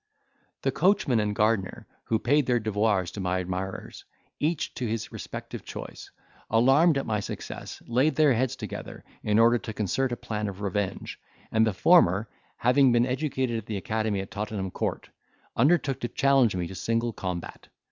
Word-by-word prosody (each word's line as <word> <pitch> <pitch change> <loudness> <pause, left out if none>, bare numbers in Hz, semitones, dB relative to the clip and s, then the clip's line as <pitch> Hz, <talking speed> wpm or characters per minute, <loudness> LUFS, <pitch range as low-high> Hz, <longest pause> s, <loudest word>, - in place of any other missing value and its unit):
The - - +2
coachman 180 - +2
and 105 -1 -1
gardener, 105 -2 0 0.2
who 115 - +1
paid 140 +5 +2
their 120 -1 +3
devoirs 105 -4 0
to - - -8
my 90 -1 0
admirers, 95 +1 -5 0.4
each 155 +1 -1
to 125 - -3
his 110 -1 -3
respective - - -7
choice, - - -8 0.4
alarmed 135 +8 +5
at 135 - -2
my 105 -2 0
success, 100 - -7
laid 130 +5 +2
their 150 -2 +5
heads 130 +2 0
together, - - -7 0.2
in 105 0 +1
order 115 +1 +5
to 110 - -6
concert 115 +6 -1
a 120 - -2
plan 105 -1 -3
of 100 0 -7
revenge; 100 -1 -3 0.3
and 110 0 +3
the - - +2
former, 105 - +4 0.3
having 125 +2 +4
been 120 0 +4
educated 130 -2 -1
at 110 - -12
the 105 - -3
academy 110 -2 -1
at 95 - -9
Tottenham 105 -3 -4
Court, - - -3 0.5
undertook 140 0 +2
to 120 - -2
challenge 135 -5 +3
me 90 -1 -1
to 85 - -7
single 115 +4 -1
combat. 90 -3 -6
115 Hz, 170 wpm, -27 LUFS, 105-130 Hz, 0.5 s, alarmed